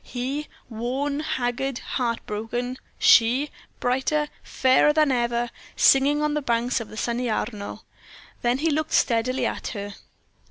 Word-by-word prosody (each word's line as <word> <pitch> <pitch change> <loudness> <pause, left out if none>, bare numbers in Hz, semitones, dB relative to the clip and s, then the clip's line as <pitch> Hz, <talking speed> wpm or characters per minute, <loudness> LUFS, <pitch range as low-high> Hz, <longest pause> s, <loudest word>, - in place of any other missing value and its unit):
He, 270 +4 -4 0.2
worn, 260 +5 -2
haggard, 260 -2 -2
heartbroken; 240 +1 -3 0.2
she, 255 +5 +5 0.3
brighter, 270 +4 0
fairer 260 +3 +3
than 305 -2 +3
ever, 240 -1 0 0.2
singing 285 +2 +4
on 300 0 +1
the 300 - 0
banks 240 -1 0
of 230 - -7
the 215 - -10
sunny 240 +2 -1
Arno. 215 -2 -4 0.6
Then 240 +1 +2
he 315 +3 +1
looked 310 +1 -1
steadily 245 +2 +2
at - - -3
her. 200 0 -5
250 Hz, 130 wpm, -24 LUFS, 235-280 Hz, 0.6 s, she